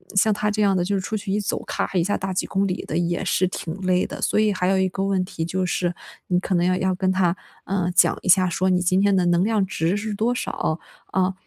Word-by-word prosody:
像 210 +2 +4
他 210 +1 -1
这 210 0 -1
样 200 -1 +3
的 175 - +1
就 200 - 0
是 195 - 0
出 215 +4 -3
去 200 -1 -5
一 205 - +1
走， 205 - -3
咔 - - -2
咔 190 - -3
一 170 - +3
下 205 +4 0
大 195 0 -4
几 - - -1
公 195 +1 0
里 180 - -3
的 160 - -3
也 175 +1 -1
是 185 0 +2
挺 165 -2 -5
累 185 -1 +2
的。 - - -8
所 - - +1
以 215 -1 +3
还 180 -1 -1
有 195 - +3
一 190 - +2
个 195 +1 -3
问 195 -2 +1
题 165 - -5
就 185 +2 -1
是 175 0 -1 0.3
你 180 -1 +2
可 185 0 -1
能 175 0 +2
要 185 0 +2
要 185 0 0
跟 185 +1 +1
他， 185 -2 +2 0.3
呃， 185 -2 -1
讲 - - +4
一 - - -4
下 185 0 +6
说 185 +2 0
你 180 -1 +3
今 185 +2 +2
天 200 0 +3
的 185 -2 +2
能 175 +1 +3
量 215 -2 +1
值 180 +1 -1
是 215 +1 -3
多 225 +4 0
少， 160 -8 -2 0.3
啊， 190 0 0
185 Hz, 305 characters per minute, -23 LUFS, 180-200 Hz, 0.3 s, 下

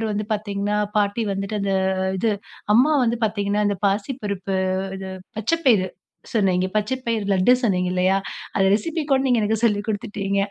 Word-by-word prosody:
அதுக்கப்புறம் 220 -1 -1
வந்து 210 0 -2
பார்த்தீங்கன்னா 205 0 -2 0.2
பாட்டி 205 +2 +1
வந்துட்டு 195 +2 -3
அந்த 200 -1 0 0.5
இது, 225 +4 +1 0.4
அம்மா 260 +7 +5
வந்து 235 0 0
பாத்தீங்கன்னா 205 0 -1
அந்த 200 - -1
பாசிப்பருப்பு 200 -2 -2 0.4
இது 190 0 -6 0.3
பச்ச 220 +8 -1
பயிறு 205 -7 +4 0.4
சொன்னீங்க 185 -4 +2
பச்ச 215 +4 0
பயிரு 225 -3 0
லட்டு 190 +5 +4
சொன்னீங்க 185 -7 +1
இல்லையா, 185 +1 +2 0.4
அந்த 195 - +2
ரெசிப்பி 310 +11 0
கூட 270 -1 +4
நீங்க 250 -2 +3
எனக்கு 215 +1 +1
சொல்லி 210 -3 +3
கொடுத்துட்டீங்க 200 -1 -2
205 Hz, 160 wpm, -22 LUFS, 195-225 Hz, 0.5 s, அம்மா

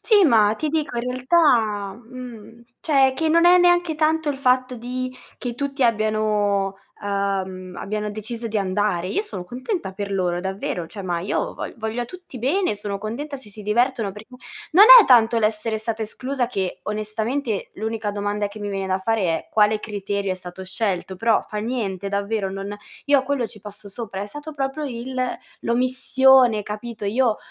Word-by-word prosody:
Sì, 415 -5 +5
ma 220 -6 +5
ti 310 - -2
dico 300 -5 -2
in - - -2
realtà, 245 - +2
mhmm, 235 -1 -11 0.2
cioè 270 -4 +3
che 320 +3 0
non 335 +2 +5
è 360 - +8
neanche 350 -2 +3
tanto 310 0 +1
il 285 - -1
fatto 255 -1 +2
di 255 +2 -4 0.2
che 245 -2 -4
tutti 275 +1 -2
abbiano, 215 -3 +1 0.3
ehm, 190 -2 -2
abbiano 210 +1 -3
deciso 225 +3 -6
di 220 -1 -1
andare. 190 -2 0
Io 405 - 0
sono 305 - -7
contenta 250 - -4
per 200 +1 -5
loro, 180 -2 0
davvero, 190 -2 -3
cioè, 200 - -9
ma 175 -2 -2
io 190 - -2
vo - - -6
voglio 225 +1 -3
a - - -3
tutti 355 -1 -11
bene, 295 - +1
sono 205 -1 -4
contenta 270 +8 -5
se 260 - -13
si 210 +1 -9
divertono 225 0 +1
perché 210 +2 -12 0.4
non 380 +6 +9 0.2
è 415 - +2
tanto 235 -2 +5
l'essere 220 0 0
stata 220 0 -3
esclusa 255 +3 -3
che 195 -6 -3
onestamente 215 +3 -2
l'unica 220 0 -3
domanda 205 0 -2
che 205 - -11
mi 205 -1 -4
viene 195 -1 -3
da 190 0 0
fare 225 +2 0
è: 165 -2 -1
"Quale 215 0 +3
criterio 200 -2 -3
è - - -2
stato 185 0 -9
scelto?" 190 -1 -2
Però 225 +3 +2
fa 215 - -6
niente, 210 -4 -3
davvero, 200 0 -1
non 195 +1 -5 0.3
io 285 0 +5
a - - 0
quello 265 -3 -1
ci 215 -1 -13
passo 205 0 -10
sopra, 200 -2 -6
è 205 - -3
stato 295 +8 -8
proprio 275 +1 -3
il 255 -1 -5 0.5
l'omissione, 255 -1 +4
capito, 210 +1 -6
io 225 +1 +2
220 Hz, 180 wpm, -22 LUFS, 200-255 Hz, 0.5 s, non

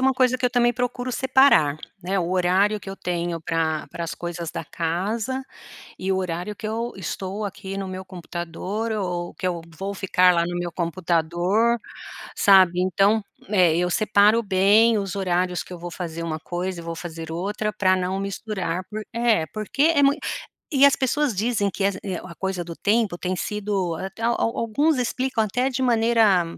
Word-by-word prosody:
uma 265 0 +3
coisa 255 0 +2
que 250 - +2
eu - - +2
também 240 -1 +3
procuro 245 +1 -2
separar, 260 - +4 0.3
né, 190 +2 -1
o 175 -1 -1
horário 185 +3 +2
que - - -10
eu 195 - -6
tenho 175 -2 -2
para 160 -1 -1
para 170 - -5
as 165 - -4
coisas 170 -1 -5
da - - -5
casa, 205 - -2 0.5
e 190 - -2
o 190 - +2
horário 185 +2 -3
que 215 - -6
eu 230 +2 -2
estou 190 +3 -4
aqui 195 0 -6
no 195 - -3
meu 185 0 -6
computador, 185 +4 -5
ou 180 -4 -3
que 185 - -4
eu 175 -2 -1 0.2
vou 195 +1 -3
ficar 185 -2 +3
lá 170 -1 +2
no 175 0 -3
meu 175 -1 -3
computador, 175 +6 +1 0.6
sabe 185 -3 +6
então, 195 +4 +3 0.3
é 180 -6 +4
eu 180 +1 +1
separo 215 +3 +4
bem 205 +3 +4
os 195 -1 -3
horários 180 -2 0
que - - -13
eu 180 - -7
vou 175 +1 -7
fazer 170 -1 -5
uma 160 -2 -3
coisa 180 +1 -4
e - - -9
vou 165 0 -5
fazer 165 -1 -7
outra 205 +5 -2
pra 190 -3 +3
não 185 +1 -1
misturar, 195 -3 -3 0.3
é, 230 -7 +2
porque 215 +6 -2
é 285 - +4
mui 280 +1 +5 0.6
e 280 -1 +7
as 280 - +5
pessoas 270 -1 +1
dizem 215 0 +1
es 200 -1 +2
eh, 190 -2 -4
a 185 - -9
coisa 190 -2 -2
do 170 -1 -8
tempo 210 -4 +1
tem 185 +1 -2
sido, 200 -4 -2 0.2
al 235 +1 +1
al 230 - 0
alguns 280 +6 +1
explicam 255 -1 0
até 245 +5 0
de 260 +1 -2
maneira, 225 -6 +4
195 Hz, 185 wpm, -23 LUFS, 175-225 Hz, 0.6 s, e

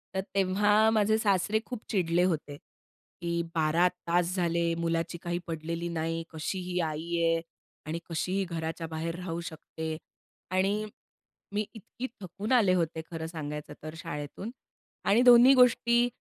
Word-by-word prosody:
तर 190 - +1
तेव्हा 205 +3 +4
माझे 220 0 +3
सासरे 205 0 +2
खूप 245 -3 -6
चिडले 175 -4 +2
होते 155 -5 -1
की 170 +3 -7
12 165 +3 +4 0.2
तास 175 +1 +2
झाले, 170 -1 +1
मुलाची 165 +1 -1
काही 175 0 -2
पडलेली 165 +1 -3
नाही. 165 0 -2
कशी 160 +4 -3
ही 180 0 -2
आई 160 +3 -4
आहे 165 0 +3 0.5
आणि 165 +2 -2
कशी 165 +2 -2
ही 195 - +2
घराच्या 165 0 -3
बाहेर 165 +1 -3
राहू 170 -2 -4
शकते. 160 0 -6 0.6
आणि 195 +3 +1 0.7
मी 210 +1 0
इतकी 235 +4 -7
थकून 195 +5 -5
आले 215 -8 +5
होते 165 -2 0
खरं 160 -1 -4
सांगायचं 150 -2 -6
तर 155 - -6
शाळेतून 150 +8 -6 0.6
आणि 215 +5 +5
दोन्ही 245 +1 +9
गोष्टी 240 -1 +5
170 Hz, 145 wpm, -29 LUFS, 165-205 Hz, 0.7 s, दोन्ही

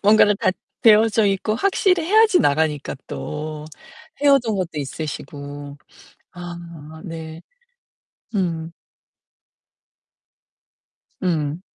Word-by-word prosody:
뭔가를 210 0 +5
다 - - +2 0.3
되어져 220 -1 +5
있고 200 +2 0
확실히 365 - +2
해야지 430 +1 +5
나가니까 150 0 +1
또. 150 - -5 0.6
헤어진 275 -6 +4
것도 180 -2 -2
있으시고. 145 0 -6 0.6
아 170 -3 -9
네. 160 -1 -7 0.9
음. 165 -4 -1 2.5
음. 160 -2 -1
170 Hz, 170 characters per minute, -21 LUFS, 155-215 Hz, 2.5 s, 뭔가를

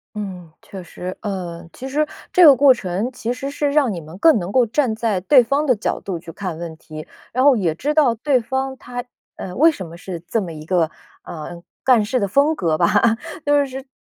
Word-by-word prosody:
嗯， 185 -5 -7
确 190 -2 -10
实。 180 +2 -7
呃， 180 -5 -5
其 265 - -8
实 300 +2 0 0.2
这 360 -2 +6
个 285 - +9
过 275 0 +6
程 200 +3 -3
其 240 0 -3
实 275 +2 -5
是 285 0 -1
让 285 -5 +2
你 180 - -4
们 160 +2 -11
更 320 -7 +5
能 180 0 -4
够 250 +2 +4
站 230 0 0
在 220 -4 -1
对 255 +6 +5
方 280 +6 0
的 255 -4 +3
角 210 - -2
度 180 -4 -4
去 165 - -10
看 180 -4 -6
问 165 -2 -7
题， 155 -1 -10 0.2
然 255 +2 +1
后 280 -1 +6
也 180 -8 0
知 295 - -2
道 280 -6 +4
对 255 +3 +1
方 265 +3 -3
他， 245 -1 -6 0.3
呃， 180 -1 -7
为 320 +5 +5
什 185 - -8
么 170 +1 -11
是 175 -2 -7
这 225 - 0
么 185 -5 -5
一 155 0 -10
个 170 -2 +1 0.3
呃， 170 +2 -8 0.2
干 245 -5 +4
事 250 +4 0
的 200 - 0
风 285 +10 +2
格 165 - 0
吧， 170 0 +3 0.6
就 290 -1 +3
是 265 0 -8
220 Hz, 240 characters per minute, -20 LUFS, 180-270 Hz, 0.6 s, 个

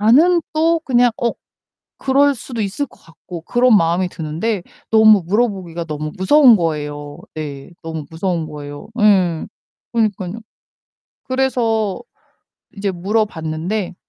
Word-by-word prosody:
반은 315 +11 +5
또 325 +1 +2
그냥 245 -4 +3
어 235 - +3 0.7
그럴 280 +1 +3
수도 235 -1 -6
있을 205 +9 -2
것 - - -22
같고...' 165 +1 -11
그런 245 +2 +4
마음이 175 +1 +2
드는데 170 +6 -3 0.3
너무 220 -3 +6
물어보기가 190 -5 -1
너무 155 -1 -5
무서운 245 +5 +6
거예요. 150 -3 -3 0.2
네, 145 0 -6
너무 160 -2 -5
무서운 165 -1 -2
거예요. 145 0 -9
예. 185 -6 +3 0.5
그러니깐요. 210 -3 -1 0.8
그래서 235 -6 0 0.8
이제 200 0 -1
물어봤는데 185 -1 -2
195 Hz, 270 characters per minute, -19 LUFS, 165-235 Hz, 0.8 s, 너무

